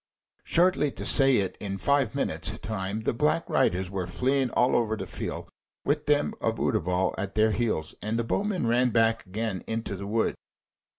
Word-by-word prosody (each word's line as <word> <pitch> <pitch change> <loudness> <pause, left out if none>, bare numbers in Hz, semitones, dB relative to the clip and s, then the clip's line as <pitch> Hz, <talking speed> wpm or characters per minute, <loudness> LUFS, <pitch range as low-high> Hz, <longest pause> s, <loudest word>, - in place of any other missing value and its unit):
Shortly 170 -4 +3
to - - -7
say 135 -2 +6
it, 95 -2 -1
in 100 -1 -4
five 140 +6 +1
minutes' 140 - -2
time 105 0 -4
the 110 - 0
Black 150 +6 +1
Riders 90 +1 +1
were 95 -3 -3
fleeing 130 0 +1
all 125 +2 +2
over 110 -2 +1
the - - -5
field - - -5 0.4
with 145 +1 0
them 145 0 +2
of 115 0 -1
Utterbol 90 -2 0
at 100 0 -4
their 110 0 +4
heels, 110 -9 -1
and 110 +2 -2
the 115 - 0
bowmen 195 - -1
ran 120 +2 +3
back 115 0 +2
again 105 0 -3
into 115 -2 -3
the 100 +1 -7
wood. 110 +2 +1
115 Hz, 180 wpm, -27 LUFS, 100-135 Hz, 0.4 s, say